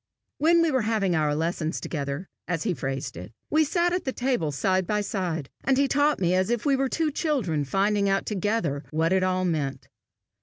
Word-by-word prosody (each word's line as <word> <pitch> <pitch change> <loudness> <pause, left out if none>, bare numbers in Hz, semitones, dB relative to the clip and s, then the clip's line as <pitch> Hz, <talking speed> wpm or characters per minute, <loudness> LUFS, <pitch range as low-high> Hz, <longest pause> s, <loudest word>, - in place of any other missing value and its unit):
When 335 +3 +5
we 330 - +2
were 260 -2 +2
having 210 -5 +1
our 150 -2 +1
lessons 160 0 -1
together, 140 +3 -4 0.2
as 175 -3 -1
he 200 - 0
phrased 135 -3 -4
it, 90 +4 -8 0.2
we 315 +1 +4
sat 345 +3 +1
at 360 - -1
the 265 - -1
table 245 - 0
side 185 +5 0
by 210 -1 +1
side, 180 -8 -2 0.2
and 270 -1 +2
he 280 0 +3
taught 290 +2 +2
me 180 -1 +2
as 185 +2 +2
if 240 -1 -1
we 280 -2 +4
were 270 0 0
two 320 +1 0
children 250 - 0
finding 200 +6 +1
out 195 0 +1
together 200 -8 -1
what 160 +3 +1
it 190 - +3
all 185 0 +1
meant. 140 -6 -2
190 Hz, 205 wpm, -26 LUFS, 160-260 Hz, 0.2 s, When